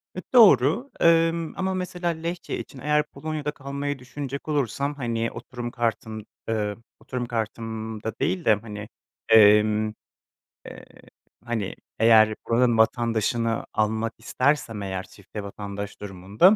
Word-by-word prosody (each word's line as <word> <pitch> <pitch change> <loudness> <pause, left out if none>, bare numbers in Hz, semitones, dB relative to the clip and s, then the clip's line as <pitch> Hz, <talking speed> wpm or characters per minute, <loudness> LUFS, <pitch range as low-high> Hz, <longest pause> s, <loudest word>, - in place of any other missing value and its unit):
E, 185 - -4
doğru, 225 - +6
emm, 165 0 +3
ama 190 0 0
mesela 180 -1 -2
Lehçe 170 +2 -4
için 135 - -9
eğer 150 +3 +2
Polonya'da 150 0 -4
kalmayı 140 -1 -4
düşünecek 140 +3 -6
olursam, 140 0 -1
hani, 115 -4 -2
oturum 120 -2 -6
kartım, 110 -3 -2 0.2
eee 105 -2 -1 0.2
Oturum 125 -2 -4
kartımda 110 -1 -4
değil 170 +5 0
de, 110 - +6
hani, 105 0 -6 0.4
emm, 105 0 +6 0.7
eee, - - -10 0.6
hani, 110 -5 -2 0.2
eğer 110 -1 +6
buranın 120 0 +3
vatandaşını 115 0 +1
almak 110 +1 0
istersem 120 -2 0
eğer 95 -1 -3
çifte 105 +2 -9
vatandaş 100 0 -6
durumunda 100 - +3
115 Hz, 120 wpm, -25 LUFS, 110-145 Hz, 0.7 s, doğru